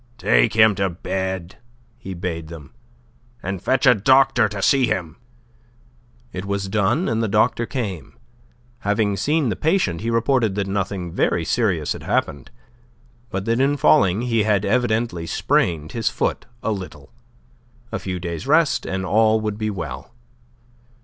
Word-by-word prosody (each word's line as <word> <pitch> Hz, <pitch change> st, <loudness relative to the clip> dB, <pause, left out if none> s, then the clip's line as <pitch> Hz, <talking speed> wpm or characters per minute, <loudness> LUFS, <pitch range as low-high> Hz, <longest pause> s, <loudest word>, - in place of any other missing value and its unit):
"Take -, -, +2 dB
him 110 Hz, -1 st, +6 dB
to 95 Hz, -, +2 dB
bed," 95 Hz, +1 st, -4 dB, 0.4 s
he 95 Hz, -1 st, -8 dB
bade 85 Hz, -2 st, -4 dB
them, 80 Hz, -4 st, -11 dB, 0.7 s
"and 95 Hz, 0 st, -4 dB
fetch 135 Hz, +2 st, +1 dB
a 125 Hz, -, +8 dB
doctor 130 Hz, +1 st, +4 dB
to 105 Hz, -1 st, -6 dB
see 130 Hz, +5 st, +3 dB
him." 90 Hz, -7 st, -3 dB, 1.2 s
It 95 Hz, -, -5 dB
was 100 Hz, 0 st, -3 dB
done, 105 Hz, -, +1 dB
and 115 Hz, 0 st, 0 dB
the 115 Hz, -, 0 dB
doctor 115 Hz, +3 st, +1 dB
came. 100 Hz, -, -5 dB, 0.6 s
Having 105 Hz, -2 st, 0 dB
seen 150 Hz, -, +1 dB
the 100 Hz, -, -1 dB
patient, 150 Hz, -, 0 dB
he 115 Hz, -, -2 dB
reported 115 Hz, -2 st, +1 dB
that 100 Hz, -1 st, -1 dB
nothing 95 Hz, -2 st, -3 dB
very 80 Hz, 0 st, 0 dB
serious 95 Hz, -10 st, 0 dB
had -, -, -9 dB
happened, 70 Hz, -, -2 dB, 0.8 s
but 95 Hz, +1 st, -4 dB
that 115 Hz, +1 st, +1 dB
in 140 Hz, +2 st, +2 dB
falling 115 Hz, -8 st, +4 dB
he 115 Hz, -3 st, +1 dB
had 105 Hz, -2 st, +1 dB
evidently 110 Hz, -6 st, 0 dB
sprained 80 Hz, -2 st, 0 dB
his 115 Hz, -2 st, -1 dB
foot -, -, -2 dB, 0.2 s
a 110 Hz, -, 0 dB
little. 95 Hz, -, -7 dB, 0.8 s
A -, -, -3 dB
few 90 Hz, -1 st, -4 dB
days' 85 Hz, +6 st, -5 dB
rest 155 Hz, +1 st, +2 dB
and 95 Hz, 0 st, -3 dB
all 110 Hz, +2 st, +3 dB
would 105 Hz, -1 st, -4 dB
be 110 Hz, 0 st, -1 dB
well. 85 Hz, -, -7 dB
105 Hz, 155 wpm, -21 LUFS, 90-115 Hz, 1.2 s, a